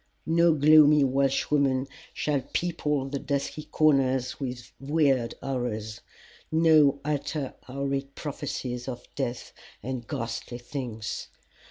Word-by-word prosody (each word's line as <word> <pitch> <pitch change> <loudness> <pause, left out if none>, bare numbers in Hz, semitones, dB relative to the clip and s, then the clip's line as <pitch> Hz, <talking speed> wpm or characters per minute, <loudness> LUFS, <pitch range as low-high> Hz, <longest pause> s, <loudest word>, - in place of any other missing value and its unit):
No 170 +1 +4
gloomy 150 0 +7
Welshwoman 135 0 +2 0.3
shall 145 -2 -1
people 150 -5 0
the 140 0 -3
dusky 140 +2 -3
corners 135 -5 +2
with 125 -3 -5
weird 135 -4 +1
horrors, 120 -4 -3 0.5
nor 155 -3 +5
utter 145 -1 -2
horrid 140 +1 -3
prophecies 130 -4 -4
of 125 -2 -6
death 125 -3 -4 0.3
and 125 -1 -4
ghastly 120 -3 -4
things. 120 -4 -5
135 Hz, 105 wpm, -27 LUFS, 125-150 Hz, 0.5 s, gloomy